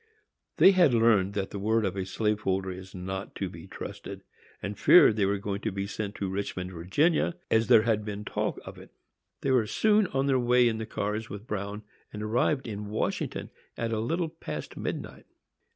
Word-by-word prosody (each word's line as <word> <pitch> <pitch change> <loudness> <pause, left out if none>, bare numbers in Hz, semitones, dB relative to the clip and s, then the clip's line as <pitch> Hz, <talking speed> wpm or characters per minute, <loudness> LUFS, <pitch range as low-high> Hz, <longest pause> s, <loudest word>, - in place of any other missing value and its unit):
They 195 - +8
had 175 -9 +4
learned 110 -4 +3
that 100 -1 -2
the 100 - -5
word 110 +2 +1
of 95 -1 -2
a 95 -1 -3
slave 105 +2 0
holder 95 -2 -1
is 95 +1 -10
not 95 +1 -5
to 95 - -2
be 85 -2 -11
trusted, - - -8 0.4
and 100 +1 -5
feared 145 -11 +7
they 100 -3 +2
were 100 +1 +1
going 100 0 -4
to 110 - -2
be 100 +1 -3
sent 100 0 -5
to 100 - -3
Richmond, 95 -1 -4
Virginia, 145 - +1 0.2
as 110 0 +3
there 110 - +7
had 110 -2 +1
been 105 0 -6
talk - - -2
of - - -9
it. - - -13 0.5
They 135 - 0
were 120 -4 +3
soon 210 - +3
on 135 -3 -1
their 135 -2 +3
way 125 0 +4
in 110 -1 -1
the 110 - -5
cars 105 +1 -3
with 100 +2 -8
Bruin, 105 -1 -4 0.3
and 105 0 -6
arrived 120 +5 +1
at 105 -3 -5
Washington 105 +1 -3 0.3
at 115 -1 -2
a 110 - 0
little 165 +9 -1
past 165 +1 -7
midnight. - - -5
105 Hz, 200 wpm, -28 LUFS, 100-115 Hz, 0.5 s, They